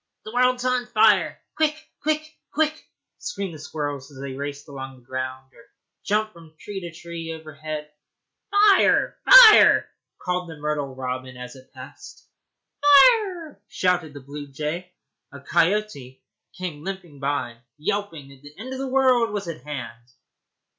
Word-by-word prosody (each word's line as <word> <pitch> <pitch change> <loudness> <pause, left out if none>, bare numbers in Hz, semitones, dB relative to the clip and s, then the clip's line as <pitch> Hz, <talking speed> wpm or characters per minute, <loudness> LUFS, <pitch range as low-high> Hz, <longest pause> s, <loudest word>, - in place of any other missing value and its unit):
'The 215 - -8
world's 250 0 +2
on 250 -1 0
fire! 220 -2 +3 0.2
quick, 310 -1 +1 0.3
quick, 305 +1 0 0.3
quick, 310 +1 +1
quick!' 315 - -22 0.3
screamed 195 -3 -5
the 155 - -10
squirrels 145 -2 -5
as 140 - -15
they 135 -1 -6
raced 140 +1 -6
along 135 -2 -8
the 125 -2 -21
ground 130 +1 -6
or 235 - -18 0.4
jumped 215 +1 0
from 165 -2 -16
tree 195 +4 -7
to 170 -1 -7
tree 170 -1 -7
overhead. 155 -1 -7 0.6
'Fire! 405 -1 +4
fire!' - - +9 0.3
called 180 -1 -3
the 160 - -9
myrtle 145 -3 -3
robin 130 0 -5
as 125 +1 -9
it 130 0 -17
passed. - - -13 0.6
'Firrrrrre!' 335 - +5
shouted 175 -5 -1
the 145 - -9
blue 145 +2 -9
jay. 155 +6 -5 0.4
A 140 - -10
coyote 165 -3 -1 0.3
came 170 -5 -6
limping 180 -6 -7
by, 135 -4 -2 0.2
yelping 160 -3 -3
that 135 -1 -16
the 145 +1 -15
end 255 +5 -7
of 260 - -6
the 270 - -3
world 255 -3 +3
was 205 -3 -4
at 165 -6 -6
hand. 125 -4 -8
160 Hz, 155 wpm, -23 LUFS, 140-220 Hz, 0.6 s, fire